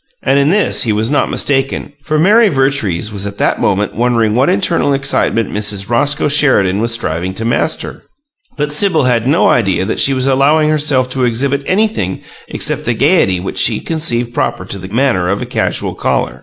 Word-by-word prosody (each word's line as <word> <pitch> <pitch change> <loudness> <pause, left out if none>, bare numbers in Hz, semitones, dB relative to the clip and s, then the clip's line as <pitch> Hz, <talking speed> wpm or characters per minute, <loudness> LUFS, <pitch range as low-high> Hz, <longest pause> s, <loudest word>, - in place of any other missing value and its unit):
And 140 - +2
in 140 +1 +2
this 205 +4 +2
he 115 - +1
was 110 +3 -1
not 145 - +1
mistaken, 135 +1 -1
for 155 +2 -2
Mary 210 +7 +4
Vertrees 135 - 0
was 100 -1 -3
at 100 0 -8
that - - 0
moment 105 +1 0
wondering 115 -2 +1
what 125 +4 +2
internal 120 +7 +1
excitement 135 -5 0
Mrs. 105 0 -2
Roscoe 145 +6 +1
Sheridan 130 -10 +2
was 115 +1 -1
striving 95 -5 -2
to 115 - -5
master. 120 +7 -2 0.6
But 150 0 -2
Sibyl 160 0 +1
had 120 -2 0
no 155 +6 +3
idea 100 -5 +1
that 110 - -3
she 135 - +4
was 130 0 -1
allowing 145 +3 +2
herself 145 -4 +1
to 130 -1 -1
exhibit 135 +4 -1
anything 190 - -1 0.3
except - - 0
the 120 - 0
gaiety 135 - +2
which 90 - -5
she - - +2
conceived 120 -8 -2
proper 95 - -2
to 100 +1 -6
the 95 - -8
manner 105 -5 0
of 100 +2 -1
a - - -4
casual - - -2
caller. - - -2
125 Hz, 190 wpm, -13 LUFS, 105-145 Hz, 0.6 s, Mary